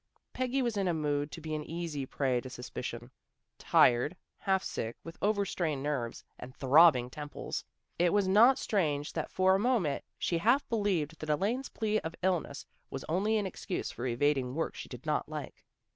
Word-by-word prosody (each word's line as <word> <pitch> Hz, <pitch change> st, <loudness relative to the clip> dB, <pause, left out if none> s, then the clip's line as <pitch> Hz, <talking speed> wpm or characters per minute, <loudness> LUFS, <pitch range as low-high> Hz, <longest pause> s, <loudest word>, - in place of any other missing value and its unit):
Peggy 255 Hz, +1 st, 0 dB
was 235 Hz, -4 st, -1 dB
in 195 Hz, -2 st, +1 dB
a 175 Hz, -, +1 dB
mood 145 Hz, -1 st, -1 dB
to -, -, -7 dB
be 155 Hz, 0 st, -5 dB
an 155 Hz, -1 st, -2 dB
easy 160 Hz, -5 st, -4 dB
prey 130 Hz, -3 st, 0 dB
to 130 Hz, -, -8 dB
suspicion. 125 Hz, -1 st, -6 dB, 0.5 s
Tired, 125 Hz, +8 st, +4 dB, 0.2 s
half 190 Hz, -2 st, +1 dB
sick, 115 Hz, +1 st, -4 dB
with 165 Hz, 0 st, -9 dB
over 205 Hz, -1 st, +2 dB
strained 155 Hz, -7 st, -2 dB
nerves, 135 Hz, -6 st, -2 dB, 0.2 s
and 130 Hz, +1 st, -9 dB
throbbing 135 Hz, -2 st, +6 dB
temples, 145 Hz, 0 st, -5 dB, 0.4 s
it 175 Hz, 0 st, +4 dB
was 205 Hz, -2 st, +2 dB
not 230 Hz, +8 st, +6 dB
strange 150 Hz, -, 0 dB
that -, -, -3 dB
for 190 Hz, 0 st, +3 dB
a 190 Hz, -, +3 dB
moment 210 Hz, -, +1 dB
she 170 Hz, -, 0 dB
half 240 Hz, +10 st, +3 dB
believed 185 Hz, -9 st, 0 dB
that 155 Hz, -, -6 dB
Elaine's 215 Hz, -, 0 dB
plea 215 Hz, -1 st, 0 dB
of 160 Hz, +1 st, -6 dB
illness 175 Hz, -6 st, -1 dB, 0.2 s
was 135 Hz, -, -6 dB
only 200 Hz, +7 st, +1 dB
an 210 Hz, -, 0 dB
excuse 190 Hz, 0 st, -4 dB
for 125 Hz, -, -4 dB
evading 130 Hz, +1 st, +1 dB
work 165 Hz, -, -1 dB
she -, -, -8 dB
did -, -, -9 dB
not -, -, 0 dB
like. -, -, -7 dB
165 Hz, 185 wpm, -31 LUFS, 140-200 Hz, 0.5 s, throbbing